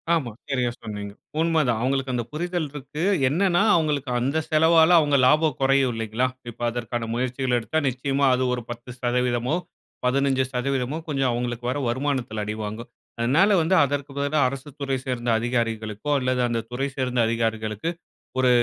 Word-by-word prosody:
"ஆமா. 135 -8 -2 0.2
சரியா 125 -3 +1
சொன்னீங்க. 105 -2 -6 0.3
உண்ம 165 -1 +3
தான்." 115 -2 +1
"அவுங்களுக்கு 135 0 0
அந்த 120 -1 0
புரிதல் 175 0 -2
இருக்கு. 145 +1 -6 0.3
என்னன்னா, 175 +4 +2
அவங்களுக்கு 150 -5 0
அந்த 135 +6 0
செலவால 160 +1 +5
அவுங்க 145 -2 +3
லாபம் 150 +1 +3
கொறையும் 135 -1 +3
இல்லேங்களா! 115 +3 -1 0.2
இப்ப 120 - -12
அதற்கான 120 -1 -3
முயற்சிகள் 125 +1 -1
எடுத்தா, 120 +7 -1
நிச்சயமாக 135 +2 +1
அது 130 - 0
ஒரு 125 - -2
10% 120 0 -2
மோ, 155 - +2 0.5
15% 130 0 0
மோ - - -2
கொஞ்சம் 135 -3 +1
அவுங்களுக்கு 120 0 -3
வர 130 - -1
வருமானத்தில 125 -4 -1
அடிவாங்கும். 110 +2 -5 0.3
அதனால 135 - +4
வந்து 165 +4 +2
அதற்கு 140 0 -2
பதிலா 145 +2 +1
அரசுத்துறை 135 0 -4
சேர்ந்த 125 -2 -2
அதிகாரிகளுக்கோ! 115 0 -2
அல்லது 130 -1 0
அந்த 120 -1 -1
துறை 135 +3 -1
சேர்ந்த 125 -2 -1
அதிகாரிகளுக்கு 110 +2 -1 0.5
ஒரு 130 -1 +4
130 Hz, 150 wpm, -24 LUFS, 120-145 Hz, 0.5 s, செலவால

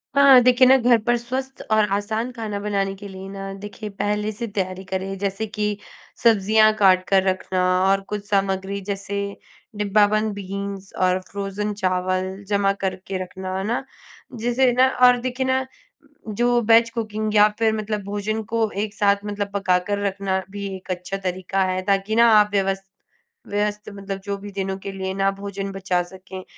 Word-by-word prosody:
हाँ, 280 -2 +8
देखिए 250 +1 +6
ना, 265 - +8
घर 245 -1 +4
पर 240 +1 +2
स्वस्थ 260 +3 -5
और 215 -1 +4
आसान 220 +4 -2
खाना 220 -4 -4
बनाने 200 -1 -1
के 200 +1 -10
लिए 190 0 -9
ना, 195 0 -6
देखिए 205 +2 -8
पहले 210 +1 -1
से 225 +3 -5
तैयारी 190 -2 -3
करें। 190 +1 -4
जैसे 200 +2 -2
कि 210 -1 -2 0.5
सब्ज़ियाँ 215 -1 +5
काट 185 -2 +5
कर 195 -1 +4
रखना 185 -1 0 0.3
और 195 0 +3
कुछ 210 -1 -4
सामग्री, 195 0 0
जैसे 200 0 -4 0.4
डिब्बाबंद 210 +1 +2
बीन्स 200 0 -6
और 185 0 +2
फ्रोज़न 200 +1 -3
चावल 185 0 -1
जमा 200 -1 +2
करके 190 0 -3
रखना, 185 +1 -6
है 190 - -2
ना? 235 +4 -1 0.5
जिसे 245 +3 +2
ना 255 +2 +5 0.2
और 250 0 +5
देखिए 255 +1 -2
ना, 260 0 +1 0.6
जो 240 +3 +2
वेज 230 0 +6
कुकिंग 215 -2 -3
या 210 0 +7
फिर 220 -1 +3
मतलब 215 -1 -3
भोजन 205 +2 -2
को 225 -1 +2
एक 210 0 -2
साथ 200 -1 +1
मतलब 205 -1 -3
पका 190 -3 +2
कर 205 0 -1
रखना 195 -1 -1
भी 200 0 -5
एक 185 0 -8
अच्छा 180 +2 -4
तरीका 190 0 -1
है, 185 0 -1
ताकि 195 +2 0
ना, 235 0 +6
आप 210 0 +3
व्यवस 195 -1 0 0.6
व्यवस्थ 210 +1 -2
मतलब 195 -1 -6
जो 200 -1 -2
भी 200 +1 -9
दिनों 195 -1 -3
के 195 - -6
लिए 190 -1 -4
ना, 195 0 +2
भोजन 195 0 -5
बचा 190 -2 0
सकें। 185 +1 -10
200 Hz, 175 wpm, -22 LUFS, 195-215 Hz, 0.6 s, हाँ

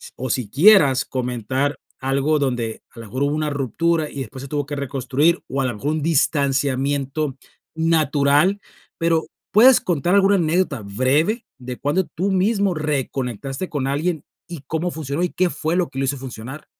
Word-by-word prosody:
o 130 0 -5
si 115 -4 -1
quieras 150 - +5
comentar 130 +3 -2 0.2
algo, 140 +3 +1
donde 120 -5 -2
a - - -11
la 115 - -8
mejor 130 +6 -5
hubo 145 +1 +1
una 155 -1 -1
ruptura, 150 +4 0
y 140 - -6
después 130 +2 -8
se 135 - -7
tuvo 145 0 -2
que 145 0 -5
reconstruir, 140 +4 0
o 135 +1 -2
a - - 0
la 125 - -1
mejor 140 +8 -2
un 155 -1 -1
distanciamiento 140 -2 0 0.4
natural, 160 +2 +2 0.4
pero, 165 -1 +1 0.3
¿puedes 245 +4 +7
contar 175 +2 +1
alguna 200 0 +5
anécdota 165 - 0
breve, 135 - 0
de 125 0 -7
cuándo 175 +7 0
tú 190 +4 0
mismo 195 0 +2
reconectaste 135 - -3
con 140 -3 -2
alguien, 150 +3 -1 0.3
y 170 -6 -7
cómo 160 +4 -2
funcionó 155 0 -4
y 180 - +1
qué 180 -1 0
fue 160 +2 -2
lo 180 -6 +1
que 135 - -5
lo 135 - +1
hizo 140 +1 -1
funcionar? 130 +3 -8
145 Hz, 175 wpm, -21 LUFS, 130-165 Hz, 0.4 s, puedes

